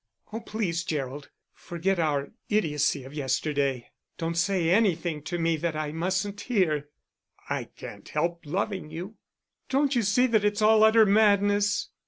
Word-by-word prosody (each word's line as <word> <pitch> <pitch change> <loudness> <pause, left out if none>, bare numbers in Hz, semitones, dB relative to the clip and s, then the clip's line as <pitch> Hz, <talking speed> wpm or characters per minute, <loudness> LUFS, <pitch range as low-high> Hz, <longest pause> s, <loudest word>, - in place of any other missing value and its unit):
"Oh, 225 - -3
please, 205 -7 -2
Gerald, 145 -3 -4 0.2
forget 175 +2 -2
our 145 -3 0 0.2
idiocy 150 -8 +1
of 135 +2 -11
yesterday. 140 -2 -1 0.3
Don't 165 0 -2
say 175 -1 +1
anything 175 -6 +1
to 175 - -3
me 165 -1 +1
that 165 0 -2
I 155 -1 -3
mustn't 190 +5 -2
hear." 160 - 0 0.6
"I - - -1
can't - - -11
help 170 0 -1
loving 185 +2 -3
you." 180 +7 -7 0.5
"Don't 275 0 +1
you 240 - +3
see 220 +5 +3
that 225 -4 +2
it's 205 0 +1
all 215 0 +6
utter 220 0 +6
madness!" 205 0 +3
175 Hz, 150 wpm, -27 LUFS, 155-205 Hz, 0.6 s, all